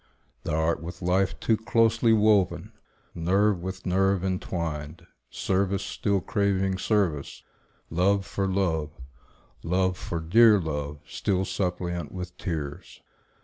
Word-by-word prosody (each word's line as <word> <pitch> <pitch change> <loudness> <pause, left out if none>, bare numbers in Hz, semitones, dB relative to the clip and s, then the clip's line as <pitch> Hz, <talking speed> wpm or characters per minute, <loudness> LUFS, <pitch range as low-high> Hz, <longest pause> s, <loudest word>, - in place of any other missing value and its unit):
Thou 75 - -1
art 80 +1 +1
with 85 +2 -8
life 90 +2 +1
Too 115 - +2
closely 115 +1 +2
woven, 105 -3 +3 0.4
nerve 95 +3 +1
with 95 +1 -6
nerve 95 0 +2
intwined; 85 -4 -3 0.2
Service 95 0 0
still 100 -2 -1
craving 95 -1 0
service, 95 -10 -1 0.5
love 95 +4 +2
for 100 -1 -2
love, 85 -6 0 0.7
Love 90 +2 +1
for 85 - -4
dear 105 +6 +6
love, 75 -3 -4
still 95 -1 -1
suppliant 90 -5 -3
with 90 -1 -7
tears. 75 -6 -5
95 Hz, 115 wpm, -26 LUFS, 85-100 Hz, 0.7 s, dear